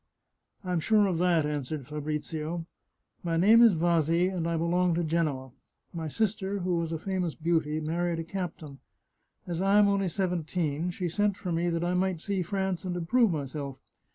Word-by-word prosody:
" - - -46
I'm 180 -2 -1
sure 210 +5 +3
of 180 -4 0
that," 170 -3 +3
answered 150 -1 -3
Fabrizio. 155 +3 -4 0.3
" - - -47
My 165 -1 0
name 215 +7 +6
is 230 -6 +7
Vasi, 170 +1 +2
and 165 -2 -1
I 170 -1 0
belong 175 +1 +1
to 170 - 0
Genoa; 155 -5 -1 0.4
my 165 -2 -4
sister, 200 +2 -1
who 180 -1 0
was 165 -1 -2
a 165 - -1
famous 180 -1 -2
beauty, 160 -2 0
married 170 +2 -1
a 165 - -3
captain. 165 -5 -6 0.7
As 170 0 -3
I 195 +1 +4
am 210 -1 +6
only 200 -1 +1
seventeen, 170 -3 -1
she 180 0 -3
sent 205 +3 0
for 180 - -4
me 170 +1 +1
that 165 0 -1
I 175 +1 0
might 185 -1 0
see 195 +2 -2
France 190 0 -2
and 180 -1 -3
improve 225 +7 +3
myself. 140 -3 -4
170 Hz, 185 wpm, -28 LUFS, 160-185 Hz, 0.7 s, is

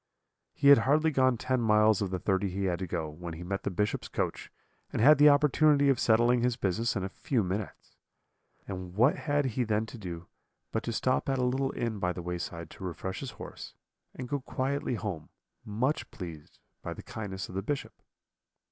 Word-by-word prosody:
He 140 - +4
had 140 - +9
hardly 150 +6 +3
gone 130 -3 +3
ten 130 +2 0
miles 105 -2 +4
of 100 - -1
the 95 - -2
thirty 95 +1 0
he 95 +2 -3
had 90 -3 0
to 95 - -3
go, 80 -2 -2
when 85 +2 -7
he 85 - -8
met 100 +2 -3
the - - -2
Bishop's 105 +3 -1
coach, - - -3 0.4
and - - -3
had 145 +6 +7
the 150 0 +9
opportunity 145 0 +4
of 135 -3 +3
settling 120 +2 +4
his 125 0 +1
business 100 +5 0
in 100 - -1
a - - -1
few 125 - -1
minutes. 95 +2 -5 0.7
And 90 -2 -6
what 125 +7 +4
had 145 -1 0
he 125 0 0
then 110 -1 0
to 115 +1 -10
do 85 -3 -6 0.5
but 115 - -1
to 115 - -1
stop 130 +4 0
at 135 - +1
a 125 - 0
little 135 +2 0
inn 115 -3 -2
by 90 -1 0
the 90 - -7
wayside 85 -2 -5
to - - -11
refresh 95 +1 -4
his 135 - -5
horse, - - -9 0.4
and 125 - -6
go 145 +2 -1
quietly 130 0 -2
home, 95 -7 -5 0.3
much 125 +8 -1
pleased 85 -7 -9 0.2
by - - -5
the - - -10
kindness 95 -3 -6
of - - -11
the 95 - -2
Bishop? 140 +7 -3
110 Hz, 205 wpm, -29 LUFS, 95-130 Hz, 0.7 s, had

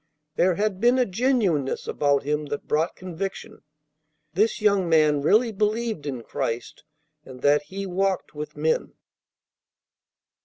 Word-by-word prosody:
There 180 0 +3
had 200 0 -1
been 240 +2 +4
a 250 - +3
genuineness 195 - 0
about 145 -1 +1
him 150 +1 -1
that 145 0 -5
brought 160 +3 0
conviction. 185 +1 -6 0.7
This 210 +4 +1
young 200 -4 +2
man 155 -3 +4
really 220 - +3
believed 215 -5 -1
in 130 -4 -4
Christ 115 +1 -4 0.4
and 130 -2 -12
that 145 +1 +4
He 195 +1 -5
walked 190 0 -1
with 150 0 -7
men. 155 +2 0
180 Hz, 130 wpm, -24 LUFS, 150-210 Hz, 0.7 s, been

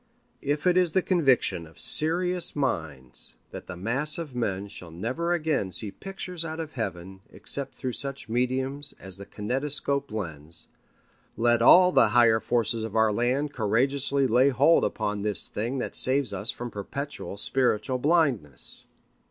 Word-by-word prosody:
If 145 +3 -1
it 180 0 +4
is 180 -3 +3
the 190 - +3
conviction 130 - +2
of 80 +1 -19
serious 175 - 0
minds 80 - -2 0.2
that - - -9
the 95 - -7
mass 130 +11 -1
of 160 -6 -6
men 100 -5 -2
shall 95 -4 -9
never 125 - -3
again 155 - 0
see 100 +3 -1
pictures 180 - -5
out 160 0 -5
of 160 -2 -5
Heaven 95 - -5
except 140 -1 -4
through 130 -1 -4
such 140 +1 -5
mediums 130 +4 +1
as 95 -1 -4
the 100 - -10
kinetoscope 135 +5 -1
lens, 80 -6 -4 0.7
let 120 0 +3
all 180 +9 +8
the 115 - +5
higher 115 0 +5
forces 115 -1 0
of 110 -1 -5
our 110 -1 +4
land 130 +6 0
courageously 135 +5 +1
lay 130 +2 +4
hold 140 +6 +4
upon 105 0 -1
this 105 0 +1
thing 120 +6 -3
that 125 - -3
saves 130 -2 +1
us 105 - -2
from 120 0 -4
perpetual 125 +2 -6
spiritual 130 +2 +1
blindness. 130 - 0
125 Hz, 155 wpm, -27 LUFS, 105-145 Hz, 0.7 s, all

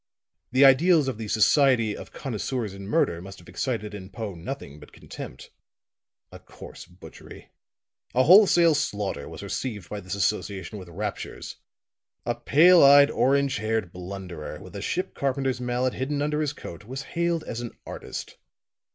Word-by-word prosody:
The 130 +3 +6
ideals 150 +3 +5
of 125 -4 -3
the 110 - -5
'Society 115 0 +3
of - - -10
Connoisseurs 120 -3 -4
in 100 0 -9
Murder' 85 -5 +1
must 95 +1 -10
have 85 - -16
excited 105 +3 -3
in 95 -2 -8
Poe 110 -2 -6
nothing 85 - -7
but 75 - -15
contempt. - - -10 0.8
A - - -11
coarse - - -12
butchery 90 -3 -14 0.6
a 130 - +5
wholesale 175 -1 +7
slaughter 105 - -2
was - - -9
received 105 -9 -4
by 105 - -4
this 95 0 -5
association 100 -1 -2
with 90 -2 -11
raptures; 105 +5 -6 0.7
a 120 - 0
pale 165 +9 +5
eyed, 140 0 +8
orange 140 +1 +2
haired 110 -4 -2
blunderer, 90 -3 -7
with - - -12
a - - -5
ship - - -2
carpenter's 135 -2 -1
mallet 125 +1 -1
hidden 140 +3 -2
under 150 +1 0
his 150 -1 -1
coat, 85 - -10
was 130 +5 -6
hailed 170 -1 0
as 115 - -5
an 120 - -5 0.2
artist. - - -7
120 Hz, 160 wpm, -25 LUFS, 100-140 Hz, 0.8 s, eyed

